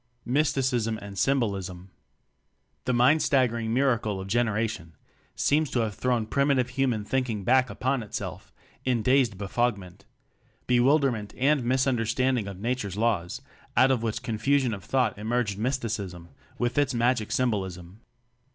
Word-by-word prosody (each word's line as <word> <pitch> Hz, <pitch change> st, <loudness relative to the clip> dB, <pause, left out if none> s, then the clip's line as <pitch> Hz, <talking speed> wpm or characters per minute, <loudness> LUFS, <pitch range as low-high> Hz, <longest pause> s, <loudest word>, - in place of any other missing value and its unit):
Mysticism 130 Hz, -5 st, +1 dB
and 100 Hz, -2 st, -9 dB
Symbolism. 100 Hz, -6 st, -1 dB, 0.9 s
The 125 Hz, -, +1 dB
mind 130 Hz, +6 st, +4 dB
staggering 120 Hz, -5 st, +1 dB
miracle 115 Hz, -6 st, +1 dB
of 95 Hz, -, -6 dB
generation 110 Hz, -6 st, -1 dB, 0.4 s
seems 150 Hz, 0 st, +2 dB
to 120 Hz, -, 0 dB
have 110 Hz, -2 st, -2 dB
thrown 120 Hz, 0 st, 0 dB
primitive 140 Hz, 0 st, +1 dB
human 125 Hz, -5 st, -1 dB
thinking 120 Hz, -5 st, -1 dB
back 130 Hz, +4 st, +3 dB
upon 130 Hz, 0 st, -1 dB
itself 105 Hz, -, -6 dB, 0.3 s
in 125 Hz, -4 st, 0 dB
dazed 125 Hz, -5 st, +3 dB
befogment 100 Hz, -2 st, -2 dB, 0.6 s
bewilder 135 Hz, +3 st, +3 dB
ment 105 Hz, -3 st, -6 dB
and 140 Hz, +2 st, +3 dB
mistunderstanding 125 Hz, -2 st, +1 dB
of 95 Hz, -2 st, -9 dB
Na 120 Hz, +5 st, 0 dB
ture's 100 Hz, -6 st, -5 dB
laws, 105 Hz, -6 st, -1 dB, 0.3 s
out 130 Hz, +2 st, +6 dB
of 125 Hz, -4 st, +1 dB
which 115 Hz, +1 st, -3 dB
confusion 125 Hz, +2 st, +1 dB
of 100 Hz, -3 st, -7 dB
thought 120 Hz, -2 st, 0 dB
emerged 110 Hz, -2 st, -1 dB
Mysticism 105 Hz, -8 st, -3 dB, 0.3 s
with 120 Hz, +3 st, 0 dB
its 135 Hz, -3 st, +1 dB
magic 120 Hz, -2 st, +1 dB
symbolism. 95 Hz, -6 st, -2 dB
120 Hz, 135 wpm, -27 LUFS, 105-130 Hz, 0.9 s, out